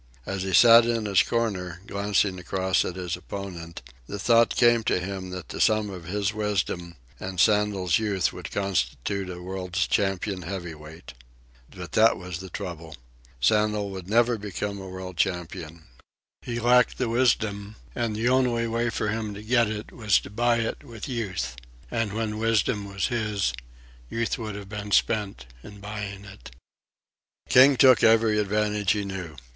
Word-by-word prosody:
As 95 -1 -3
he 95 0 -3
sat 115 +5 +8
in 115 -2 0
his 100 -2 +4
corner, 95 -7 -2
glancing 100 -2 0
across 95 +1 0
at 90 - -4
his 90 -2 -3
opponent, 90 -4 -8 0.2
the 100 - -5
thought 115 +3 +3
came 120 -1 +4
to - - +2
him 95 0 -5
that 90 -3 -7
the - - -4
sum 110 -2 +2
of 90 -3 -9
his 100 +3 -1
wisdom 95 -5 -2 0.2
and 95 -1 -5
Sandel's 105 -3 +3
youth 100 -4 0
would - - -7
constitute 100 -1 -2
a 90 -1 -7
world's 90 0 -2
champion 95 -1 -1
heavyweight. 85 -4 -8 0.6
But - - -9
that 110 +1 +4
was 90 -1 -6
the 95 0 -8
trouble. 85 -5 -7 0.4
Sandel 105 - +2
would 95 -1 -8
never 120 +1 +3
become 100 0 -4
a 95 - -8
world 90 -1 -8
champion. 85 -2 -3 0.6
He 120 -1 -4
lacked 125 +1 +4
the 125 - 0
wisdom, 110 -4 0 0.2
and 115 - -2
the 115 +3 0
only 125 -2 +2
way 115 +1 0
for 105 - -2
him 110 -1 -3
to 105 - -9
get 120 +1 +3
it 110 0 -6
was 110 -4 +2
to - - -11
buy 120 +2 +2
it 115 - -4
with 115 -6 -8
Youth; 95 - -3 0.4
and 115 -3 -1
when 110 -1 -2
wisdom 105 -2 0
was 100 0 -1
his, 105 - -1 0.6
Youth 115 0 -2
would 110 -3 -5
have 100 -1 -8
been 105 -1 -6
spent 100 - +1 0.2
in 105 +6 -12
buying 100 -1 -6
it. 100 0 -12 1.0
King 135 +2 +7
took 130 -3 +6
every 110 -1 +4
advantage 105 -1 +1
he 105 -1 -2
knew. 95 -5 -6
100 Hz, 165 wpm, -26 LUFS, 95-110 Hz, 1.0 s, sat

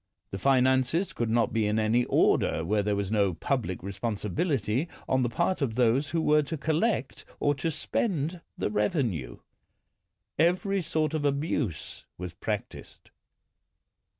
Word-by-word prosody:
The 95 - -4
finances 130 - +2
could 120 -1 -2
not 115 -1 +2
be 110 -2 +1
in 105 +1 0
any 110 +3 +2
order 80 - +2
where 105 +4 +1
there 105 0 0
was 100 0 -2
no 100 -5 +2
public 115 - -2
responsi 100 0 -4
bility 135 - 0 0.2
on 130 0 +2
the 120 - +1
part 170 +7 0
of 120 -6 -1
those 125 +4 +2
who 165 - 0
were 150 0 +4
to 160 +2 -4
collect 160 - 0 0.2
or 145 - +2
to 145 +4 -2
spend 165 - -2 0.2
the - - -1
revenue. 105 - -1 1.0
Every 185 +4 +2
sort 155 -2 -1
of 155 -2 -1
abuse 140 - -2
was 90 0 -6
practised. - - -6
130 Hz, 150 wpm, -28 LUFS, 105-155 Hz, 1.0 s, were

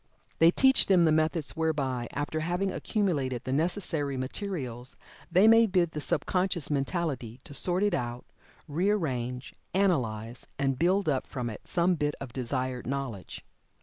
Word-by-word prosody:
They 165 - +7
teach 265 +8 +4
them 180 -3 +5
the 160 - +4
methods 155 0 +1
whereby, 140 -7 -1
after 145 +2 -2
having 175 +4 -1
accumulated 140 - -1
the 130 - -2
necessary 155 -3 0
materials, 130 - -4 0.4
they 185 +5 +6
may 225 0 +7
bid 180 -4 +1
the 150 - -5
sub 145 - -1
conscious 180 -5 0
mentality 135 -5 -2
to - - -10
sort 180 +6 +1
it 205 -2 +2
out, 120 -5 -3 0.4
rearrange, 145 - -1 0.2
analyze, 120 - 0
and 135 -2 0
build 185 +3 +2
up 135 -4 0
from 120 -3 -4
it 105 - -10
some 175 +1 +2
bit 150 -3 -1
of 130 -4 -8
desired 130 -1 -3
knowledge. 130 -8 -5
150 Hz, 150 wpm, -28 LUFS, 130-180 Hz, 0.4 s, They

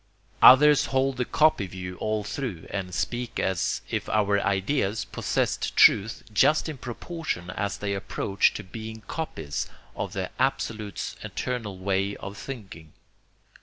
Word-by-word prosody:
Others 145 +3 +8
hold 135 0 +1
the 125 - 0
copy 150 -11 +3
view 90 0 -7
all 110 -1 -1
through, 105 - -4
and 95 -2 -3
speak 120 +6 -2
as 95 0 0
if - - -3
our 100 -1 +2
ideas 100 +2 0
possessed - - -1
truth 110 +3 +5
just 150 +9 +4
in 150 -4 -6
proportion 120 - -5
as 100 +1 -2
they 100 -1 -2
approach 100 0 +1
to - - -5
being 110 +3 -8
copies 80 - -4 0.3
of - - -4
the - - -3
Absolute's 110 -3 -2
eternal 115 -6 -4
way 100 +1 0
of 100 - -8
thinking. 100 - -9
105 Hz, 135 wpm, -26 LUFS, 95-125 Hz, 0.3 s, Others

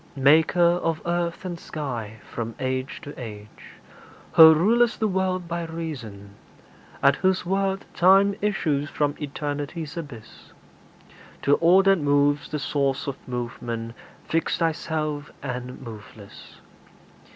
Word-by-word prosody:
Maker 150 +5 +4 0.2
of 165 -1 -1
earth 170 +1 -2
and 175 -2 -5
sky, 120 -10 -6
from 115 -1 -5
age 130 0 -3
to 145 - -8
age 105 -2 -10 0.6
Who 160 -1 +9
rul'st 230 +8 +3
the 220 - +1
world 185 -2 -1
by 170 0 -3
reason; 130 -12 -7 0.7
at 140 0 +5
whose 185 -1 +1
word 195 +1 -1
Time 195 +3 +5
issues 155 -8 0
from 145 -2 0
Eternity's 145 +2 -4
abyss: 145 -10 -10 0.9
To 140 - +3
all 180 +3 +5
that 195 -1 +4
moves 145 0 +2
the 150 - -2
source 140 -1 -1
of 140 -3 -3
movement, 120 -2 -5 0.3
fixed 165 0 -1
Thyself 155 -3 -2
and 125 -2 -5
moveless. 110 -3 -12
150 Hz, 120 wpm, -24 LUFS, 130-170 Hz, 0.9 s, Who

